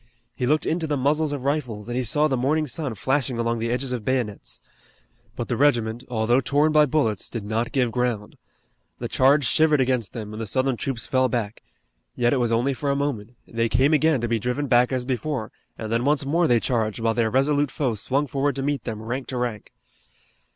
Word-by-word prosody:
He 125 - -1
looked 150 +3 +2
into 165 0 -1
the 145 -1 0
muzzles 150 +3 +1
of 140 -3 -4
rifles, 125 -7 -2
and 120 - -4
he 130 - 0
saw 150 +6 +2
the 135 - 0
morning 145 +5 +1
sun 140 -2 -3
flashing 130 +2 0
along 115 0 -1
the 115 +1 -2
edges 125 +2 -1
of 125 -4 -3
bayonets. 120 -5 -2 0.8
But 120 - -4
the 120 - -1
regiment, 120 -4 +1
although 120 +1 +2
torn 145 +3 +2
by 150 -1 +5
bullets, 115 -8 0
did 115 -3 -5
not 110 +3 -1
give 125 -4 +1
ground. 120 -3 -2 0.6
The - - -4
charge 140 +2 +3
shivered 155 +5 +3
against 125 -4 0
them, 110 -2 -6
and 110 - -6
the 110 - -4
Southern 130 +4 0
troops 120 0 -4
fell 130 -1 +2
back. 115 -3 -3 0.5
Yet 120 +1 +2
it - - +2
was 120 -2 0
only 120 +4 +1
for 140 +2 -3
a 140 - +2
moment. 125 -5 -3
They 115 0 -1
came 135 +7 +3
again 155 -3 +3
to 120 - -1
be 115 0 0
driven 125 +6 -2
back 125 -1 +3
as 130 -1 -1
before, 130 -2 -3 0.3
and 110 -1 -5
then 115 +1 +1
once 145 +1 +2
more 165 +4 +2
they 120 -1 +4
charged, 110 -2 -1
while 115 0 +1
their 115 -1 +1
resolute 145 +3 +2
foe 130 -4 -1
swung 135 +7 0
forward 140 0 -1
to 135 - -3
meet 145 -3 -2
them 110 -2 -5
rank 125 +4 -4
to 130 - -4
rank. 120 -4 -3
125 Hz, 220 wpm, -24 LUFS, 115-140 Hz, 0.8 s, by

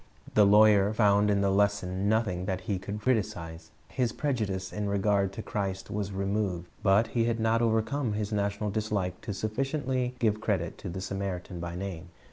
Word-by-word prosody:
The 105 -1 +6
lawyer 105 -1 +6
found 105 -1 +4
in 100 -1 +2
the 100 -1 +2
lesson 100 -1 +1
nothing 105 -5 0
that 95 -2 -2
he 95 0 -2
could 100 +2 -5
criticize. 90 -9 -2 0.2
His 125 -3 -1
prejudice 105 -10 -2
in 105 -1 -2
regard 100 -1 +1
to 110 - -6
Christ 95 -2 -3
was 100 -1 -2
removed. 95 -2 -2
But 105 +3 +3
he 115 -1 +1
had 115 -1 0
not 115 +1 +2
overcome 115 +2 +1
his 105 0 -2
national 100 0 -1
dislike 105 -4 -2
sufficiently 130 +5 -1
to - - -23
give 110 -3 +1
credit - - -1
to - - -6
the 95 +2 -5
Samaritan 95 -2 -4
by 85 0 -5
name. 90 -2 -6
100 Hz, 175 wpm, -29 LUFS, 95-110 Hz, 0.2 s, The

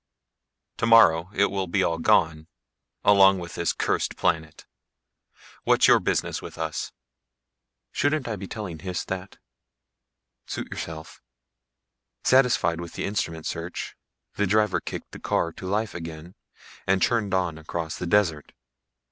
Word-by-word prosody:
Tomorrow 95 -7 +5
it 100 -1 +2
will 95 -1 -2
be 95 +2 +1
all 85 -2 0
gone 80 -1 +2 0.6
along 95 -1 +6
with 85 -2 -7
this 85 - 0
cursed - - -1
planet. 80 0 -1 1.0
What's - - +4
your - - +6
business - - -1
with - - -9
us?" - - -3 1.0
"Shouldn't 145 -2 0
I 115 - -2
be 95 -1 -7
telling 95 -7 -6
Hys 90 -1 -4
that?" 95 +1 -6 1.1
"Suit - - -5
yourself." 80 -1 -7 1.0
Satisfied 125 -10 +3
with 85 - -8
the - - -3
instrument 80 -5 -3
search, 85 +2 -5 0.4
the 100 - +1
driver 105 +2 +2
kicked - - -7
the - - -9
car 85 - 0
to 95 - -9
life 105 +2 -1
again 85 0 -8 0.5
and 95 0 +3
churned 105 -3 +1
on 90 -4 -1
across 80 0 -4
the 90 - -3
desert. 85 -6 +1
90 Hz, 135 wpm, -25 LUFS, 80-105 Hz, 1.1 s, along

